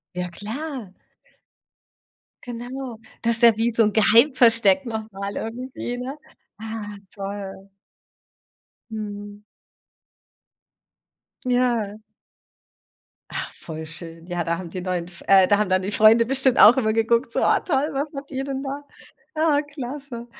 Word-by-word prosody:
Ja, 180 0 -3
klar. 230 - -6 1.5
Genau. 245 0 -7 0.2
Das 235 0 +2
ist 235 - -2
ja 230 -2 +7
wie 230 +2 +1
so 230 0 +3
'n 210 - +1
Geheimversteck 230 0 +5
noch 220 -1 -5
mal 200 +1 -5
irgendwie, 245 +1 -5
ne? 260 +3 -5 0.4
Ah, 215 -1 -6 0.2
toll. 195 -1 -7 1.2
Mhm. 205 -1 -7 2.0
Ja. 240 -4 0 1.3
Ah, - - -3
voll 160 -1 -8
schön. 165 0 -9
Ja, 175 -1 -2
da 170 0 -1
haben 175 -2 -7
die 185 - -5
neuen 180 -2 -2
F 175 -1 -14
äh, 195 -1 +7
da 205 +2 +3
haben 210 -2 +1
dann 185 0 +3
die 195 - -3
Freunde 220 +2 +6
bestimmt 265 0 +3
auch 230 +5 +9
immer 220 -4 +1
geguckt, 230 +2 +1
so: - - -1
„Ah - - +3
toll, 290 -3 0
was 285 +3 -3
macht 275 0 -8
ihr 265 0 -2
denn 270 0 -4
da?“ 280 +1 -5 0.5
Ah, 310 -2 +3
klasse. 275 -3 -7
225 Hz, 140 wpm, -23 LUFS, 200-260 Hz, 2.0 s, auch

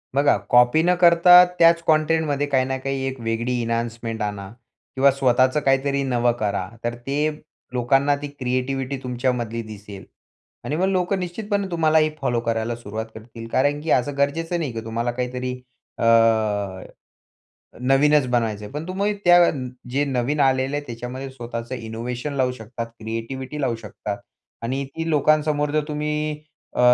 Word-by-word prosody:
बघा 140 +1 +4
कॉपी 125 +5 +5
न 180 +1 +4
करता 180 +1 +8 0.2
त्याच 170 0 +6
कंटेंटमध्ये 155 -2 +2
काही 130 -2 +2
ना 135 0 -2
काही 135 0 -3
एक 130 -1 -5
वेगळी 115 +2 -1
एन्हान्समेंट 115 -1 -3
आणा 105 -2 -4 0.5
किंवा 135 +1 +5
स्वतःच 130 0 +2
काहीतरी 140 +1 +2
नवं 120 -2 +2
करा. 100 -3 -1 0.2
तर 120 0 -2
ते 140 +5 -1 0.4
लोकांना 135 +4 +2
ती 145 - -4
क्रिएटिव्हिटी 130 0 -2
तुमच्यामधली 125 -2 -2
दिसेल. 105 -2 -10 0.6
आणि 150 - -2
मग 180 +4 +1
लोकं 185 0 0
निश्चितपणे 200 +3 -2
तुम्हालाही 160 -2 +3
फॉलो 120 -3 +1
करायला 115 +1 -1
सुरुवात 110 -1 -6
करतील. 115 +1 -10
कारण 145 +2 +1
की 160 - -2
असं 140 +3 +1
गरजेचं 165 +5 0
नाही 150 -6 -2
की 115 - -4
तुम्हाला 115 +2 -2
काहीतरी 125 +1 -3 0.5
अ, - - -3 1.8
नवीनच 135 +2 +4
बनवायचं 115 -4 -1
आहे. 105 - -10
पण 150 +3 -5
तुम्ही 200 +3 0
त्या 175 0 +7 0.4
जे 140 +3 +1
नवीन 135 +2 -1
आलेले 135 +1 +2
आहे 145 - -4
त्याच्यामध्ये 125 +3 -6
स्वतःचं 120 -1 -6
इनोव्हेशन 120 +4 -5
लावू 130 -2 +1
शकतात, 115 -1 -7
क्रिएटिव्हिटी 130 +6 -5
लावू 125 -4 0
शकता 105 -2 -6 0.5
आणि 130 +4 -2
ती 165 0 -3
लोकांसमोर 150 0 +2
जर 155 0 0
तुम्ही 150 0 -2 0.3
अ, - - +1
130 Hz, 150 wpm, -22 LUFS, 120-150 Hz, 1.8 s, करता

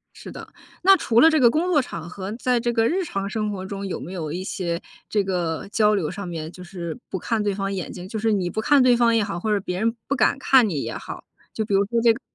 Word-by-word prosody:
是 - - -10
的， - - -10 0.3
那 385 +2 +7
除 235 -9 +2
了 320 - +7
这 315 - +3
个 245 -4 +6
工 325 +7 0
作 330 -5 +4
场 170 -10 -6
合， 190 +2 -6
在 250 +2 0
这 240 0 0
个 230 -1 +2
日 370 +3 0
常 195 - -3
生 215 -1 -2
活 190 -2 -5
中 195 +1 -5
有 190 - -4
没 180 - -8
有 160 -5 -4
一 180 +3 -4
些 175 -3 -3 0.3
这 210 - +1
个 175 -3 -2
交 210 0 +3
流 175 -7 -1
上 195 +1 -6
面 160 -2 -5
就 180 +1 -11
是 170 -3 -6
不 190 - -3
看 225 +4 -1
对 205 -1 0
方 195 0 -2
眼 185 -3 -4
睛， 180 0 -8
就 220 - -4
是 220 +1 +1
你 185 -4 0
不 220 - -2
看 280 +4 +4
对 250 -1 +5
方 235 -1 +3
也 225 - +3
好， 200 -4 -3
或 215 +4 -1
者 205 - +1
别 180 -1 -4
人 225 +3 +1
不 280 - 0
敢 250 - +3
看 265 -4 +5
你 150 -8 -2
也 - - -4
好， - - -8 0.3
就 220 - -1
比 205 - -2
如 195 +1 +4
说 230 +3 0
这 230 -1 +6
个， 230 - -9
205 Hz, 305 characters per minute, -23 LUFS, 185-235 Hz, 0.3 s, 那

